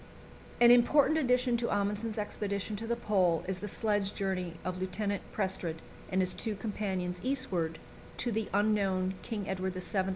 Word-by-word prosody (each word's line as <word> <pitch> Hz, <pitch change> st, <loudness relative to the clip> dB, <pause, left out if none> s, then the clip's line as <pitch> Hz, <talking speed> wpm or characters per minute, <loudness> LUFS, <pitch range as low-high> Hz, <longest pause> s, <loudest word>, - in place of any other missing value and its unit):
An 240 Hz, 0 st, +8 dB
important 285 Hz, +6 st, +5 dB
addition 250 Hz, -3 st, +3 dB
to 235 Hz, 0 st, -1 dB
Amundsen's 205 Hz, +2 st, -1 dB
expedition 205 Hz, 0 st, -2 dB
to 225 Hz, +2 st, -5 dB
the 235 Hz, -, +1 dB
Pole 185 Hz, -8 st, +2 dB
is 190 Hz, -1 st, -2 dB
the 210 Hz, -, -5 dB
sledge 205 Hz, -1 st, 0 dB
journey 185 Hz, -4 st, -2 dB
of 185 Hz, 0 st, -3 dB
Lieutenant 200 Hz, +2 st, -1 dB
Prestrud 190 Hz, -5 st, -1 dB, 0.4 s
and 190 Hz, 0 st, +2 dB
his 185 Hz, 0 st, +2 dB
two 220 Hz, -2 st, -3 dB
companions 190 Hz, -4 st, -3 dB
eastward 190 Hz, -12 st, 0 dB, 0.4 s
to 240 Hz, -, 0 dB
the 220 Hz, -1 st, -1 dB
unknown 195 Hz, -2 st, +2 dB
King 210 Hz, -4 st, -4 dB
Edward 190 Hz, -1 st, -2 dB
VII. 190 Hz, +1 st, -1 dB
200 Hz, 160 wpm, -31 LUFS, 185-225 Hz, 0.4 s, An